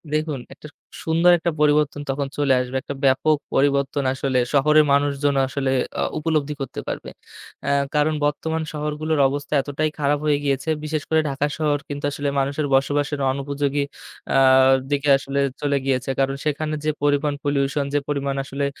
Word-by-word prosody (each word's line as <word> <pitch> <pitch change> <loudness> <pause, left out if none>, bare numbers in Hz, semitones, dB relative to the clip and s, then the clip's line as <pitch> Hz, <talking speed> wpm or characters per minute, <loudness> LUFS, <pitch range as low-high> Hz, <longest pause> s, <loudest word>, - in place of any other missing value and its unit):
দেখুন 155 -2 -1
একটা - - -12 0.4
সুন্দর 165 +2 +4
একটা 170 +1 -1
পরিবর্তন 150 -1 +2
তখন 135 +1 -1
চলে 145 -2 +3
আসবে 125 +1 -3
একটা 140 - -6
ব্যাপক 140 +3 +3 0.2
পরিবর্তন 140 0 +1
আসলে 130 -1 0
শহরের 150 +2 +5
মানুষজন 140 0 +1
আসলে 135 0 -1 0.2
এ্যা - - -3 0.2
উপলব্ধি 150 -2 0
করতে 135 - -5
পারবে। - - -5 0.6
আ - - +1 0.3
কারণ 150 +1 +2
বর্তমান 160 +2 -1
শহরগুলোর 150 +1 -2
অবস্থা 140 +1 -5
এতটাই 145 +3 -2
খারাপ 145 0 +1
হয়ে 150 -1 +3
গিয়েছে। 140 +1 -1
বিশেষ 155 -1 -2
করে 160 - +3
ঢাকা 140 +1 -1
শহর 150 -2 +1
কিন্তু 145 0 -4
আসলে 145 0 -2
মানুষের 140 +2 -1
বসবাসের 145 +2 +1
অনুপযোগী 140 +1 -1 0.5
আ - - +5 0.5
দিকে 145 0 +1
আসলে 135 +1 -3 0.2
চলে 145 -1 +1
গিয়েছে। 130 -1 0
কারণ 135 0 +1
সেখানে 155 +1 -1
যে 155 - +2
পরিমাণ 145 0 +2
পলিউশন 140 0 0
যে 145 - +3
পরিমাণ 140 -1 -1
আসলে 140 +1 -3
145 Hz, 160 wpm, -22 LUFS, 140-150 Hz, 0.6 s, শহরের